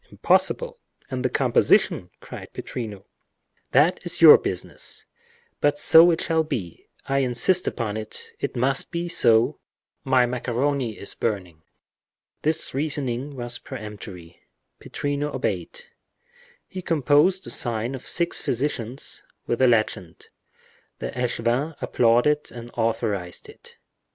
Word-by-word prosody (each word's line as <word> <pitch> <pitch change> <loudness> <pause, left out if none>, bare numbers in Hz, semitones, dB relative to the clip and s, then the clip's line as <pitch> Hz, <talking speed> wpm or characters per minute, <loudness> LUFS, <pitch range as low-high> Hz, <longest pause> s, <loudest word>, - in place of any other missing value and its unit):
impossible! - - +1 0.3
And 130 -1 -3
the 130 - +1
composition?" - - +2
cried - - -10
Pittrino. 105 -6 -6 0.7
"That - - +3
is - - -1
your - - +10
business—but 145 0 -5
so 165 +3 +7
it 165 - +1
shall 160 -1 +1
be—I 135 - -4
insist 135 +8 +3
upon 110 -3 -2
it—it 110 0 -6
must 130 +2 +1
be 170 0 -3
so—my 125 0 +1
macaroni 125 0 -2
is 100 - -2
burning." 90 -8 -3 0.8
This 155 +2 -1
reasoning 140 -2 -2
was 120 -1 -5
peremptory—Pittrino 105 - -7
obeyed. 485 - -3 0.9
He 185 - -7
composed 165 +4 +2
the - - -4
sign 115 +1 -2
of 130 - -8
six 170 0 +1
physicians, 125 -1 -3 0.2
with 120 - -1
the 130 - +5
legend; 110 -7 -1 0.7
the - - -5
echevin 125 +4 -1
applauded 120 +6 +2
and 120 0 -10
authorized 110 -6 -2
it. - - -16
125 Hz, 110 wpm, -24 LUFS, 115-145 Hz, 0.9 s, your